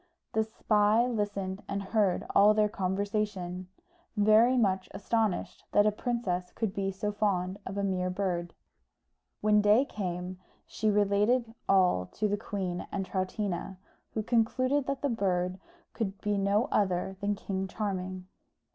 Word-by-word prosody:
The 220 Hz, -1 st, +3 dB
spy 215 Hz, +1 st, +2 dB
listened 205 Hz, -4 st, -2 dB
and 200 Hz, 0 st, -3 dB
heard 195 Hz, -2 st, +1 dB
all 210 Hz, +1 st, +6 dB
their 215 Hz, 0 st, +4 dB
conversation, 195 Hz, -2 st, -2 dB, 0.5 s
very 215 Hz, +5 st, +5 dB
much 190 Hz, -5 st, +1 dB
astonished 215 Hz, 0 st, -1 dB
that 205 Hz, -, +5 dB
a 215 Hz, -, +4 dB
princess 205 Hz, -6 st, -2 dB
could 220 Hz, -4 st, -2 dB
be 195 Hz, -2 st, -1 dB
so 195 Hz, +2 st, -2 dB
fond 195 Hz, -2 st, -1 dB
of 195 Hz, -, -5 dB
a 200 Hz, -, 0 dB
mere 185 Hz, -2 st, 0 dB
bird. 180 Hz, -2 st, -2 dB, 0.9 s
When 210 Hz, 0 st, +4 dB
day 210 Hz, +6 st, +5 dB
came 180 Hz, -4 st, -4 dB, 0.3 s
she 215 Hz, -, -1 dB
related 210 Hz, +4 st, +2 dB, 0.2 s
all 180 Hz, -, +4 dB
to 215 Hz, -, 0 dB
the 205 Hz, -, +1 dB
queen 190 Hz, -4 st, -4 dB
and 195 Hz, -1 st, -2 dB
Troutina, 190 Hz, -1 st, -3 dB, 0.4 s
who 220 Hz, -, 0 dB
concluded 255 Hz, +5 st, +1 dB
that 275 Hz, 0 st, -3 dB
the 285 Hz, -, +2 dB
bird 185 Hz, -5 st, 0 dB, 0.3 s
could 200 Hz, -4 st, -3 dB
be 210 Hz, -1 st, 0 dB
no 200 Hz, +3 st, +2 dB
other 190 Hz, -1 st, +1 dB
than 205 Hz, +1 st, 0 dB
King 195 Hz, -1 st, -3 dB
Charming. 185 Hz, -2 st, -4 dB
200 Hz, 145 wpm, -30 LUFS, 185-215 Hz, 0.9 s, all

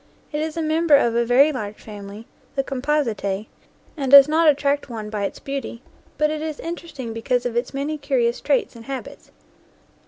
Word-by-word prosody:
It 300 Hz, 0 st, -2 dB
is 315 Hz, +1 st, -3 dB
a 325 Hz, -, -1 dB
member 315 Hz, 0 st, +4 dB
of 235 Hz, -4 st, +3 dB
a 235 Hz, -, +3 dB
very 265 Hz, +6 st, +5 dB
large 215 Hz, -6 st, -5 dB
family, 205 Hz, 0 st, -10 dB, 0.3 s
the 270 Hz, -, +1 dB
Composite, 250 Hz, -8 st, -1 dB, 0.5 s
and 275 Hz, -5 st, -3 dB
does 280 Hz, 0 st, +10 dB
not 315 Hz, +1 st, +4 dB
attract 285 Hz, -1 st, +1 dB
one 215 Hz, -3 st, -6 dB
by 205 Hz, -2 st, -2 dB
its -, -, -5 dB
beauty, 275 Hz, -3 st, -6 dB, 0.3 s
but 300 Hz, +1 st, +2 dB
it 310 Hz, 0 st, -3 dB
is 310 Hz, -1 st, -4 dB
interesting 325 Hz, -8 st, -6 dB
because 245 Hz, +2 st, -1 dB
of 240 Hz, -1 st, -2 dB
its 240 Hz, -, -1 dB
many 290 Hz, +3 st, -3 dB
curious 245 Hz, -4 st, 0 dB
traits 280 Hz, -3 st, 0 dB
and 230 Hz, -1 st, -12 dB
habits. 270 Hz, -1 st, -7 dB
275 Hz, 185 wpm, -22 LUFS, 230-300 Hz, 0.5 s, does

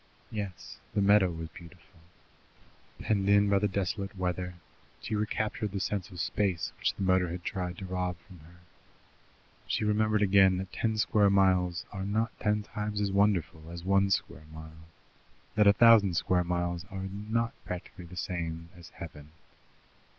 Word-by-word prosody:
Yes, 100 Hz, -5 st, -6 dB, 0.2 s
the 100 Hz, -, +2 dB
meadow 100 Hz, -2 st, +5 dB
was 80 Hz, -1 st, -6 dB
beautiful. 85 Hz, +3 st, -15 dB, 1.0 s
Penned 100 Hz, -2 st, 0 dB
in 100 Hz, 0 st, +5 dB
by 100 Hz, -, +4 dB
the 105 Hz, -, +1 dB
desolate 100 Hz, +1 st, -3 dB
weather, 90 Hz, -1 st, -2 dB, 0.4 s
she -, -, -5 dB
recaptured 105 Hz, -1 st, -2 dB
the 100 Hz, -, -2 dB
sense 100 Hz, +1 st, -2 dB
of 90 Hz, -3 st, -10 dB
space 95 Hz, -2 st, -1 dB
which -, -, 0 dB
the 100 Hz, -, -4 dB
motor 90 Hz, -1 st, +3 dB
had 90 Hz, +1 st, -6 dB
tried 90 Hz, -2 st, -3 dB
to 95 Hz, -, -7 dB
rob 90 Hz, -1 st, -2 dB
from 90 Hz, +1 st, -16 dB
her. 85 Hz, +3 st, -18 dB, 1.1 s
She -, -, 0 dB
remembered 105 Hz, 0 st, +2 dB
again 95 Hz, -1 st, +5 dB
that 95 Hz, -1 st, -6 dB
ten 110 Hz, -1 st, -1 dB
square 105 Hz, -2 st, +3 dB
miles 95 Hz, -2 st, +2 dB
are 95 Hz, -2 st, -5 dB
not 110 Hz, +3 st, 0 dB
ten 105 Hz, 0 st, +1 dB
times 105 Hz, 0 st, -4 dB
as 100 Hz, -1 st, 0 dB
wonderful 95 Hz, -6 st, +1 dB
as 85 Hz, 0 st, -8 dB
one 100 Hz, +1 st, +3 dB
square 80 Hz, -5 st, -2 dB
mile, 80 Hz, +1 st, -12 dB, 0.7 s
that 105 Hz, -1 st, +4 dB
a 100 Hz, -, +8 dB
thousand 110 Hz, -5 st, +6 dB
square 90 Hz, 0 st, +2 dB
miles 85 Hz, 0 st, -2 dB
are 95 Hz, 0 st, -5 dB
not 110 Hz, +4 st, -2 dB
practically 90 Hz, 0 st, -7 dB
the 90 Hz, +2 st, -11 dB
same 85 Hz, -2 st, -4 dB
as 85 Hz, -1 st, -13 dB
heaven. 75 Hz, -3 st, -10 dB
95 Hz, 165 wpm, -30 LUFS, 90-105 Hz, 1.1 s, a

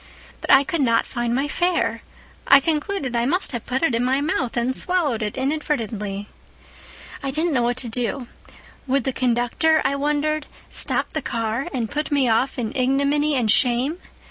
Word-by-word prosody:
"But -, -, -1 dB
I 270 Hz, -, +7 dB
could 315 Hz, +2 st, -2 dB
not 230 Hz, -3 st, +2 dB
find 240 Hz, -1 st, -2 dB
my 275 Hz, +3 st, 0 dB
fare. 350 Hz, +4 st, 0 dB, 0.5 s
I 275 Hz, -, +8 dB
concluded 300 Hz, -, -2 dB
I 235 Hz, 0 st, +1 dB
must 355 Hz, +7 st, +1 dB
have 240 Hz, -4 st, -6 dB
put 260 Hz, +4 st, -1 dB
it 325 Hz, -, +2 dB
in 230 Hz, +1 st, +1 dB
my 260 Hz, +2 st, +2 dB
mouth 270 Hz, -5 st, -1 dB
and 245 Hz, +2 st, 0 dB
swallowed 325 Hz, -11 st, 0 dB
it 210 Hz, +2 st, -3 dB
inadvertently. 225 Hz, -8 st, -2 dB, 0.9 s
"I 275 Hz, -, -3 dB
didn't 315 Hz, +4 st, -1 dB
know 250 Hz, -, +2 dB
what 240 Hz, +1 st, 0 dB
to 255 Hz, -, -2 dB
do. 245 Hz, +2 st, -3 dB, 0.6 s
Would 270 Hz, 0 st, +1 dB
the 265 Hz, -, -1 dB
conductor, 250 Hz, +6 st, +2 dB
I 275 Hz, +1 st, +1 dB
wondered, 300 Hz, +1 st, -1 dB, 0.2 s
stop -, -, +1 dB
the 310 Hz, -, -1 dB
car 230 Hz, +3 st, -2 dB
and 235 Hz, -5 st, -3 dB
put 300 Hz, +1 st, -2 dB
me 280 Hz, -3 st, +2 dB
off 235 Hz, +4 st, +1 dB
in 230 Hz, -2 st, -3 dB
ignominy 280 Hz, +3 st, +1 dB
and 235 Hz, -5 st, +2 dB
shame? 260 Hz, +6 st, +2 dB
265 Hz, 180 wpm, -22 LUFS, 240-295 Hz, 0.9 s, I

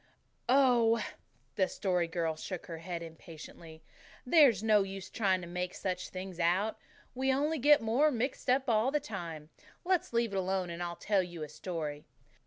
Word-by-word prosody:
"Oh!" 245 Hz, -4 st, +5 dB, 0.6 s
the 190 Hz, -, +3 dB
Story 180 Hz, -3 st, 0 dB
Girl 165 Hz, -1 st, -1 dB
shook 180 Hz, +3 st, -6 dB
her 165 Hz, -2 st, -7 dB
head 170 Hz, 0 st, -5 dB
impatiently. 160 Hz, 0 st, -11 dB, 0.4 s
"There's 250 Hz, -, +5 dB
no 215 Hz, -2 st, +5 dB
use 195 Hz, -1 st, -6 dB
trying 190 Hz, -4 st, +1 dB
to 175 Hz, -, -8 dB
make 180 Hz, +1 st, -4 dB
such 185 Hz, -1 st, -3 dB
things 185 Hz, -1 st, -7 dB
out. 185 Hz, +6 st, +1 dB, 0.3 s
We 265 Hz, +1 st, +1 dB
only 295 Hz, +4 st, +1 dB
get 290 Hz, -1 st, +5 dB
more 245 Hz, +8 st, +3 dB
mixed 255 Hz, 0 st, -2 dB
up 260 Hz, +1 st, +3 dB
all 225 Hz, +1 st, +3 dB
the 300 Hz, +2 st, +1 dB
time. 170 Hz, -, -7 dB, 0.3 s
Let's 365 Hz, -1 st, +1 dB
leave 235 Hz, -3 st, 0 dB
it -, -, -1 dB
alone 185 Hz, -1 st, -1 dB
and 170 Hz, +1 st, -6 dB
I'll 175 Hz, 0 st, -3 dB
tell 200 Hz, 0 st, +1 dB
you 175 Hz, -3 st, -6 dB
a -, -, -5 dB
story. 150 Hz, -2 st, -5 dB
190 Hz, 175 wpm, -32 LUFS, 170-240 Hz, 0.6 s, Oh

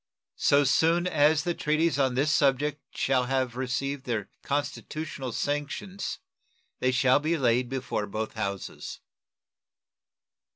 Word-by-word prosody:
So 145 Hz, 0 st, +5 dB
soon 165 Hz, +5 st, +3 dB
as 155 Hz, -3 st, +3 dB
the 175 Hz, -, 0 dB
treaties 155 Hz, -1 st, +1 dB
on 130 Hz, -2 st, +2 dB
this 145 Hz, +4 st, +2 dB
subject 145 Hz, 0 st, +2 dB, 0.2 s
shall 130 Hz, -2 st, +2 dB
have 130 Hz, -2 st, 0 dB
received 130 Hz, +2 st, -2 dB
their 110 Hz, -5 st, -3 dB
constitutional 145 Hz, -1 st, -3 dB
sanctions 145 Hz, -, -3 dB, 0.6 s
they 130 Hz, -, +2 dB
shall 130 Hz, +1 st, +4 dB
be 160 Hz, +3 st, 0 dB
laid 125 Hz, -2 st, +2 dB
before 125 Hz, -5 st, -2 dB
both 110 Hz, +2 st, -4 dB
houses. 100 Hz, -2 st, -5 dB
135 Hz, 120 wpm, -28 LUFS, 125-150 Hz, 0.6 s, So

